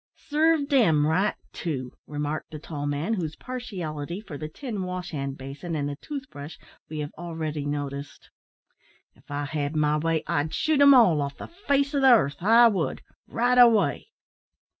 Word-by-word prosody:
"Sarved 305 -1 +1
'em 165 - +4
right 185 +7 +1 0.2
too," 130 -7 -4 0.2
remarked 150 +2 -4
the 155 - -7
tall 145 -1 -5
man, 145 +9 -1
whose 165 -7 -3
partiality 180 - -5
for 205 -8 -9
the 155 +2 -6
tin 220 - -5
wash 180 -1 -5
hand 140 -2 -4
basin 140 +6 -6
and 145 -2 -1
the 145 - -4
tooth 275 - -7
brush 145 +2 -9 0.3
we 155 - -6
have 150 -1 -4
already 160 -4 -4
noticed. 145 -1 -5 0.8
"If - - -26
I 145 0 -3
had 145 +1 -3
my 150 0 +2
way, 160 0 0
I'd 150 +2 -1
shoot 310 -2 +1
'em 280 -1 +8
all 185 - +5
off 140 0 -4
the - - -8 0.2
face 280 0 +2
o' 285 - +2
the 270 - +4
'arth, 145 - +2
I 230 +5 +7
would, 195 -7 -1 0.2
right 245 +2 +2
away." 230 - +4
160 Hz, 175 wpm, -26 LUFS, 145-230 Hz, 0.8 s, em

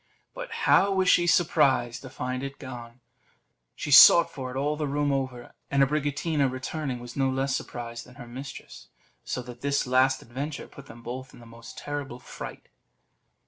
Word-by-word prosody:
But - - -7 0.2
how 200 - +5
was 190 -1 +1
she 175 -1 +4
surprised 140 -9 +2
to 130 - -9
find 125 0 -4
it 140 0 -6
gone! 120 -2 -9 0.7
She 145 - -5
sought 170 +4 +9
for 130 -2 -6
it 130 - -6
all 145 +2 0
the 150 -1 -2
room 145 +1 0
over; 130 -3 -3 0.2
and 140 0 +3
Abricotina 145 0 0
returning, 130 0 -4
was 120 0 -10
no 135 -1 +1
less 135 +1 0
surprised 120 -1 -6
than 125 - -16
her 120 - -10
mistress; 130 +3 -9 0.4
so 125 - -4
that 120 0 -11
this 140 0 0
last 130 +1 +2
adventure 140 +5 -6
put 140 -1 -14
them 115 +1 -13
both 130 +2 -7
in - - -15
the 120 - -14
most 115 0 -12
terrible 145 -4 -5
fright. 125 - -9
135 Hz, 180 wpm, -27 LUFS, 125-145 Hz, 0.7 s, sought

